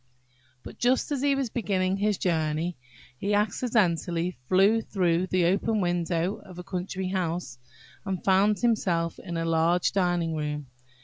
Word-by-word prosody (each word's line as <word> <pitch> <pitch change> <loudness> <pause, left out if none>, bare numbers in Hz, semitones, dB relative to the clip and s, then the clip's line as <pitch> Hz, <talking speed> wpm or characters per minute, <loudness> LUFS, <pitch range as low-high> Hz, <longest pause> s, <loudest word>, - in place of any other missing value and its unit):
But, - - -11
just 250 +4 +2
as 280 -3 -1
he 280 0 +3
was 270 -5 -2
beginning 195 -4 0
his 205 0 +1
journey, 160 0 -1 0.4
he 205 +1 0
accidentally 185 -5 +1
flew 200 +5 +4
through 180 -4 0
the 185 -2 +2
open 205 +5 +1
window 175 0 0
of 185 -3 -13
a 180 - -6
country 185 0 -4
house, 170 -8 -3 0.4
and 190 -2 -4
found 200 +2 +4
himself 180 -8 +1
in 175 -2 -5
a 165 - -1
large 165 +2 +2
dining 175 -3 +1
room. 150 -1 -3
185 Hz, 145 wpm, -27 LUFS, 170-205 Hz, 0.4 s, flew